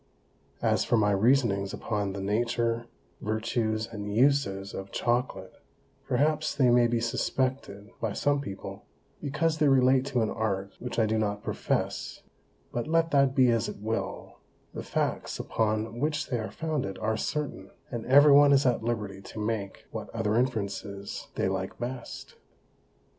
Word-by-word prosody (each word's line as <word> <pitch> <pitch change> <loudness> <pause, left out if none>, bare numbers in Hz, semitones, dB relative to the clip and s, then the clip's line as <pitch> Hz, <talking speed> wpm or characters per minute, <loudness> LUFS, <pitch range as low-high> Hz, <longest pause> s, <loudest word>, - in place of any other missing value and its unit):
As - - +3
for 120 - +2
my 105 -1 +3
Reasonings 100 -2 +2
upon 100 -3 -2
the 100 - -5
Nature, 115 +3 0 0.3
Vertues, 110 0 -1
and 105 -2 -6
Uses 110 -5 +2
of 95 0 -6
Chocolate, 120 -6 -1 0.5
perhaps 150 +4 +1
they 130 -3 +4
may 120 0 +5
be 120 0 0
suspected 115 -2 -2
by 115 - 0
some 145 +4 +1
People, 100 -8 -7 0.4
because 155 +2 0
they 150 - +4
relate 130 -1 +5
to 125 -4 +1
an 110 - -1
Art 100 -3 -2
which 125 - -5
I 115 - +4
do 110 +1 +1
not 105 -1 -1
profess; - - -2 0.5
but 120 +2 -3
let 165 +1 +2
that 140 -2 +3
be 130 -3 +5
as 115 -2 +1
it - - -7
will, 110 +2 -4 0.3
the - - -5
Facts - - -2
upon 110 +1 -1
which 150 +2 -1
they 120 - +1
are 110 - -4
founded 150 -12 -3
are 110 0 0
certain, 150 +6 -3 0.2
and 120 -2 -3
every 145 +3 +7
one 145 0 +7
is 135 0 +4
at 125 -3 +2
liberty 105 -5 -3
to 105 - -9
make 105 -2 -3
what - - -6
other 110 -2 0
Inferences 100 -4 -2
they - - +1
like 95 0 -3
best. 125 +2 -6
115 Hz, 160 wpm, -28 LUFS, 105-135 Hz, 0.5 s, every